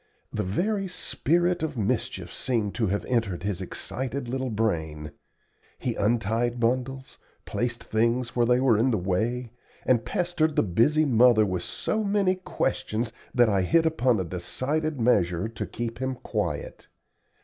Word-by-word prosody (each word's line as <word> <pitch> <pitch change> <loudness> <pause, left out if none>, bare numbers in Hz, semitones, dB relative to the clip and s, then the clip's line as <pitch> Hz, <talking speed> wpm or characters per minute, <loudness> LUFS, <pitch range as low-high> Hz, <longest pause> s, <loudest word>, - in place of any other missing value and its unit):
The - - -1
very 195 - -1
spirit 175 0 0
of 155 -4 -3
mischief 105 -3 -2
seemed 115 -6 -1
to 110 - 0
have 100 +2 -1
entered 110 -8 -1
his 100 -2 -2
excited 130 +7 -4
little 130 +1 -2
brain. 80 -9 -2 0.7
He 125 - -2
untied 115 +3 0
bundles, 130 +3 -1 0.3
placed 120 -1 -2
things 115 +2 0
where 120 -1 +3
they 125 0 +4
were 125 -5 +4
in 125 +4 +3
the 115 - +2
way, 110 +7 -1 0.3
and 120 -3 +3
pestered 160 +3 0
the - - +4
busy 120 - +3
mother 120 -4 +5
with 90 -3 -2
so 220 - -2
many 200 -2 +2
questions, 120 -10 -2 0.2
that 120 -1 +6
I 100 -3 +2
hit 165 - +3
upon 130 -8 +2
a - - 0
decided 135 - -2
measure 90 -5 +2
to 115 - -5
keep 115 0 -5
him 130 0 -2
quiet. - - -4
120 Hz, 150 wpm, -26 LUFS, 110-135 Hz, 0.7 s, that